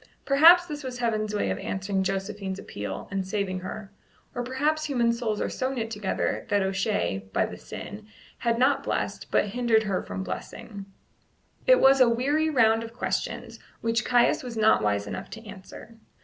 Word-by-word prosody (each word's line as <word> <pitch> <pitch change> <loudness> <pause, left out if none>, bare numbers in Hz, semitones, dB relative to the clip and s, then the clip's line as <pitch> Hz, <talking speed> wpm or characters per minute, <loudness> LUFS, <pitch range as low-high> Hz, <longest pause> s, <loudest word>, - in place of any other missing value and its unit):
Perhaps 330 +6 +7
this 300 -4 -6
was 255 -1 -5
Heaven's 215 -3 -1
way 100 - 0
of 95 - -3
answering 195 0 -2
Josephine's 195 0 -3
appeal, 105 - -6
and 195 -1 -1
saving 190 -1 -2
her; 195 +2 -7 0.4
or 245 - -3
perhaps 300 +5 0
human 245 -5 +2
souls 230 -3 -2
are - - 0
so 260 +1 -2
knit 230 -4 -3
together 210 -3 -2
that 205 -1 +2
O'Shea, 190 - -1
by - - +2
the - - -7
sin, 210 +1 -9 0.3
had 235 -1 +1
not 265 +3 +3
blessed, - - -3
but - - +2
hindered 230 0 +2
her 195 -3 -1
from 95 +1 -5
blessing. 195 - -7 0.8
It - - +7
was 270 0 +6
a 250 - +7
weary 285 +7 +1
round 225 -5 +3
of 230 0 -9
questions, 245 - -3 0.2
which 230 +1 +1
Caius 245 -1 +3
was 245 -3 -7
not 220 0 +4
wise 100 -1 0
enough - - -6
to 225 +1 -10
answer. 205 +3 -12
220 Hz, 175 wpm, -26 LUFS, 195-250 Hz, 0.8 s, Perhaps